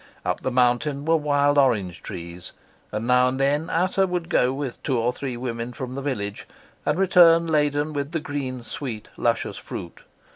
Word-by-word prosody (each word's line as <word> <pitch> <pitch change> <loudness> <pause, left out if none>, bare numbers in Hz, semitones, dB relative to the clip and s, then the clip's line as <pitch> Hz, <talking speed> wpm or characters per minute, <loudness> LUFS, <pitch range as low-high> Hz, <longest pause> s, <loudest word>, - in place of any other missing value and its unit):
Up 90 - -1
the - - -1
mountain 130 +3 +1
were 165 +1 +4
wild 145 -1 +3
orange 105 -10 +1
trees, 85 +1 -7 0.4
and 105 +2 -3
now 125 +1 +4
and 130 +1 -2
then 145 +4 +1
Ata 185 +3 +2
would 175 -2 -3
go 125 -7 +3
with 135 -2 -5
two 130 -4 0
or 120 +2 +1
three 130 -2 -5
women 120 -1 -4
from 130 +1 -6
the 140 - -4
village 105 -8 -4 0.4
and 150 - +2
return 170 -3 +6
laden 150 -1 +1
with 140 0 -3
the 165 - -1
green, 135 -4 -4
sweet, 115 -3 -6
luscious - - 0
fruit. 85 - -8
135 Hz, 180 wpm, -24 LUFS, 120-150 Hz, 0.4 s, return